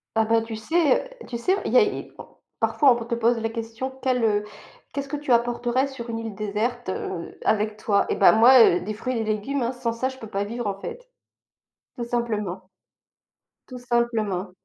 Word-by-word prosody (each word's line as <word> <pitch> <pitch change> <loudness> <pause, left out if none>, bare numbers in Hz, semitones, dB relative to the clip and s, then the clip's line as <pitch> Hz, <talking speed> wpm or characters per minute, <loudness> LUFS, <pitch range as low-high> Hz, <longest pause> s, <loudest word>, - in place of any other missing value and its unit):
Ah, 220 0 +3
bah, 225 0 +3
tu 225 -1 -6
sais, 315 - +2
heu, - - -13 0.2
tu 235 - -4
sais, 370 +11 +1
il - - -2
y - - +5
a - - +8
é 415 - -4
on - - -9 0.3
parfois, 280 -4 +4
on - - -5
te 235 -1 -2
pose 235 +1 +2
la 225 - -1
question 230 +3 -5
quel, 255 -2 +1
heu, 210 -1 +2 0.5
qu'est-ce 280 -1 -3
que 295 - -4
tu 290 -3 -3
apporterais 240 +2 +2
sur 245 -3 -8
une 225 0 -3
île 225 -3 -6
déserte, 215 +2 -2
heu, 180 -2 -5
avec 215 0 +1
toi? 205 -1 +1
Eh - - 0
bah, - - +7
moi, 245 +4 +7
heu, 175 -5 +5
des 215 +3 -4
fruits 255 +4 -3
et 225 - -1
des 215 0 0
légumes 270 +6 -3
hein, 235 +1 0
sans 245 -2 -3
ça 260 +3 -1
je 260 - -10
peux 225 - -9
pas 200 -1 -2
vivre, 230 +1 -4
en 195 -1 -2
fait. - - -8 0.9
Tout 240 - -3
simplement. 210 -6 -3 1.0
Tout 255 - -8
simplement. 230 -6 -1
235 Hz, 215 wpm, -24 LUFS, 215-255 Hz, 1.0 s, a